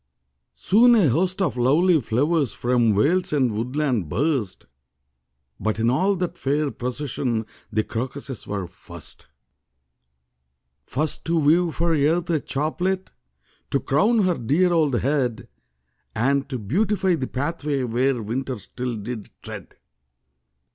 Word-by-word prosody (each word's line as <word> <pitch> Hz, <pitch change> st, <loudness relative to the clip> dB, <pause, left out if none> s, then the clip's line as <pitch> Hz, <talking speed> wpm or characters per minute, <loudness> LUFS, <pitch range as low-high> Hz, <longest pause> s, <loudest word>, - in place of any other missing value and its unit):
Soon 240 Hz, +5 st, +5 dB
a 195 Hz, -10 st, +4 dB
host 185 Hz, -, +1 dB
of 175 Hz, -, -1 dB
lovely 155 Hz, +7 st, +4 dB
flowers 140 Hz, +4 st, +1 dB
From 120 Hz, -3 st, +2 dB
vales 170 Hz, -, +2 dB
and 130 Hz, -7 st, +1 dB
woodland 125 Hz, -, -1 dB
burst; 120 Hz, -, -1 dB, 0.9 s
But 110 Hz, -1 st, -1 dB
in 115 Hz, +2 st, +2 dB
all 190 Hz, +9 st, +2 dB
that 180 Hz, -1 st, -3 dB
fair 145 Hz, +1 st, 0 dB
procession 125 Hz, -3 st, -2 dB, 0.3 s
The 110 Hz, -, +1 dB
crocuses 130 Hz, +2 st, -5 dB
were 100 Hz, -2 st, -3 dB
first. 85 Hz, -2 st, -12 dB, 1.6 s
First 150 Hz, +3 st, -1 dB
to 170 Hz, +1 st, +1 dB
weave 165 Hz, +2 st, +3 dB
for 170 Hz, 0 st, +1 dB
Earth 160 Hz, +4 st, +1 dB
a 160 Hz, -, +2 dB
chaplet 180 Hz, +8 st, -2 dB, 0.6 s
To 140 Hz, -, +1 dB
crown 210 Hz, -, +2 dB
her 180 Hz, -2 st, +1 dB
dear 165 Hz, +10 st, +2 dB
old 150 Hz, -7 st, +2 dB
head; 130 Hz, -5 st, 0 dB, 0.7 s
And 140 Hz, +4 st, +1 dB
to 130 Hz, -, -3 dB
beautify 190 Hz, -, +1 dB
the 135 Hz, -6 st, -1 dB
pathway 145 Hz, 0 st, -2 dB
Where 125 Hz, 0 st, 0 dB
winter 125 Hz, +4 st, -3 dB
still 125 Hz, +4 st, -5 dB
did 110 Hz, 0 st, -6 dB
tread. -, -, -9 dB
140 Hz, 125 wpm, -23 LUFS, 120-170 Hz, 1.6 s, Soon